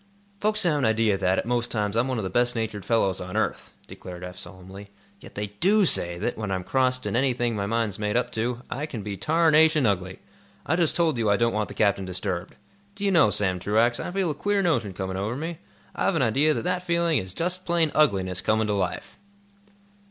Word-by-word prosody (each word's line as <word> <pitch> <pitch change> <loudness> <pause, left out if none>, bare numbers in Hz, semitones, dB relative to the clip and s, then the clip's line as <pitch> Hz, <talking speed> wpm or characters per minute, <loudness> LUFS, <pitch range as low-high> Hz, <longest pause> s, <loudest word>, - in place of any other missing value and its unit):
"Folks 215 +1 +1
have 155 -5 +2
an 135 - +1
idea 110 -2 +2
that, 95 -1 +1
at - - -1
most 120 0 -1
times, 105 -2 -2
I'm 120 +3 +2
one 130 -2 -2
of 110 - -3
the 95 - -3
best 120 +3 +1
natured 110 -3 -3
fellows 105 -5 0
on 90 0 -5
earth," - - -2
declared 90 -1 -10
Eph, 90 0 -7
solemnly. 95 +2 -11 0.3
"Yet - - -14
they 105 0 -5
do 205 +2 +4
say 85 - +5
that, 115 +5 -3
when 110 -2 -3
I'm 95 -1 -2
crossed 130 +3 0
in - - -2
anything 120 -2 +1
my 100 -1 -2
mind's 110 -3 -1
made 105 +2 0
up 125 - -1
to, 120 +2 -3
I 150 +4 -4
can 115 -9 -6
be 100 -1 -5
tarnation 155 - +3
ugly. 95 -3 -1 0.5
I 160 - +1
just 170 -3 +2
told 160 -7 +1
you 110 -2 +1
I 100 - +3
don't 115 0 +1
want 105 -1 -1
the - - -10
captain 100 -2 +1
disturbed. 90 0 -4 0.4
Do 200 0 -4
you 200 - +2
know, 165 - +5
Sam 95 -3 0
Truax, 110 +5 +1
I - - -4
feel 185 -2 -1
a - - -2
queer 200 +6 0
notion 120 - 0
coming 95 0 -4
over 105 +5 -2
me? 160 +3 -5 0.4
I've 195 - 0
an 155 - +2
idea 140 +7 +2
that - - -3
that 180 +1 -1
feeling 170 -3 +1
is 95 0 -7
just 180 +2 -2
plain 170 -3 +2
ugliness 95 -11 +1
coming 110 0 +1
to 105 - -1
life!" 95 -3 -3
115 Hz, 225 wpm, -25 LUFS, 100-155 Hz, 0.5 s, say